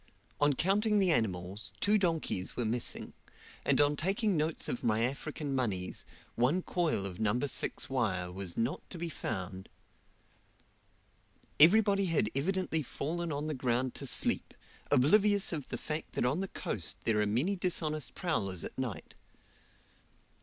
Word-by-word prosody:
On 145 0 +4
counting 210 - +2
the 190 -3 +4
animals, 100 - -1
two 210 +1 +3
donkeys 165 - -1
were 120 - 0
missing; 115 +2 -1 0.5
and - - +2
on 145 0 +4
taking 195 +6 +1
notes 155 +1 0
of - - -3
my 110 0 +2
African 140 +3 -3
moneys, 105 -9 -2 0.3
one 140 +10 +2
coil 165 - 0
of 95 0 -5
No. 110 +2 +1
6 145 0 -1
wire 95 -9 -1
was 95 -2 -5
not 115 +5 0
to 180 - -7
be 170 0 -3
found. 95 - -5 1.9
Everybody 200 +4 +6
had 150 -10 +1
evidently 165 +2 0
fallen 165 +5 -3
on 145 +1 -2
the 155 - -2
ground 125 -1 0
to - - -4
sleep, - - +1 0.3
oblivious 200 +9 +4
of 150 -5 -4
the 120 - -3
fact 155 +6 -5
that - - 0
on 135 +7 +1
the 195 - -2
coast 90 - -4
there 105 -2 +1
are 105 - +1
many 130 - +1
dishonest 160 -5 -1
prowlers 100 - -1
at - - -7
night. 125 -7 -4
145 Hz, 150 wpm, -32 LUFS, 110-175 Hz, 1.9 s, Everybody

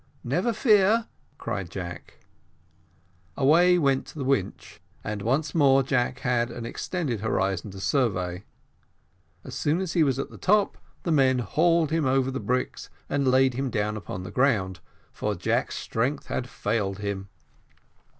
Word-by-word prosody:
"Never 175 - 0
fear," 215 -1 +4 0.3
cried 95 -4 -4
Jack. 90 0 -7 1.2
Away 170 +6 +5
went 140 -5 +1
the 145 - -6
winch, 130 -8 -2 0.2
and 105 -1 -4
once 135 +7 0
more 135 -4 +5
Jack 125 -1 0
had 125 -2 +1
an 115 0 -7
extended 140 - -3
horizon 95 -2 -1
to 95 0 -9
survey. 95 -7 0 1.0
As - - -9
soon 155 +4 0
as 190 -2 -3
he 170 - +3
was 135 -4 +2
at 140 - -4
the - - -12
top, 205 +1 +2 0.2
the 170 - -1
men 135 -4 +4
hauled 160 - +2
him 160 -4 +1
over 135 0 +2
the 130 - -3
bricks 125 0 -2 0.2
and 140 -1 0
laid 130 0 +4
him 135 +2 -2
down 105 -2 -1
upon 90 -2 -6
the 90 - -7
ground, 105 -9 +1 0.3
for - - -2
Jack's - - -1
strength 125 +6 -2
had 125 -1 -3
failed 105 -5 -2
him. 100 -1 -4
130 Hz, 150 wpm, -26 LUFS, 105-150 Hz, 1.2 s, Away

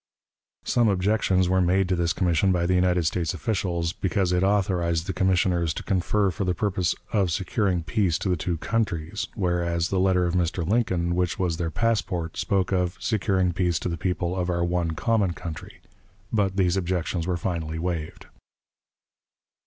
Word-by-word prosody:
Some 120 -2 +2
objections 95 -1 +2
were 95 +1 +2
made 90 +2 +2
to 90 - +2
this 85 -1 +1
commission 90 +1 +2
by 85 -2 +1
the 90 - +1
United 90 -2 +2
States 85 +1 -1
officials, 85 -2 -1
because 95 -2 0
it 90 0 +2
authorized 90 -4 +1
the 95 - -3
commissioners 90 -3 +1
to - - -5
confer 100 +1 +1
for 95 - -3
the 90 -1 0
purpose 95 -2 0 0.2
"of 100 -4 +2
securing 95 0 0
peace 95 -3 +1
to 95 - -3
the 90 - +2
two 85 +1 -2
countries"; 95 -2 -2
whereas 85 -3 0
the 95 - 0
letter 90 -1 +3
of 85 - -1
Mr. 85 -2 0
Lincoln, 90 -6 +1
which 90 -1 0
was 90 -3 -1
their 85 -1 -1
passport, 90 -6 -1
spoke 95 -3 0
of 90 -2 0
"securing 95 -5 +1
peace 90 -2 +1
to - - -3
the 85 - -2
people 90 0 -2
of 90 -1 -1
our 85 -1 0
one 85 -1 0
common 105 -3 +1
country." 85 -3 -8 0.5
But 100 -3 +1
these 90 -2 +2
objections 90 -2 -1
were 90 -1 0
finally 80 -2 -3
waived. 80 -2 -4
90 Hz, 175 wpm, -25 LUFS, 85-95 Hz, 0.5 s, letter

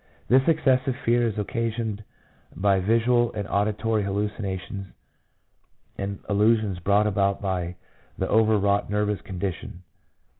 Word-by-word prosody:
This 130 +2 +6
excessive 135 -5 +2
fear 120 0 +3
is 110 - -4
occasioned 110 0 -2 0.5
by 95 +3 +2
visual 115 +4 +2
and 105 -2 -4
auditory 105 +2 0
hallucinations 100 -1 -3 1.1
and 100 0 -4
illusions 105 -2 +2
brought 100 +4 +2
about 100 -1 +1
by 90 -3 -2 0.4
the - - -1
over 110 0 +3
wrought 100 0 +1
nervous 105 0 0
condition. 90 -1 -5
105 Hz, 115 wpm, -25 LUFS, 100-115 Hz, 1.1 s, This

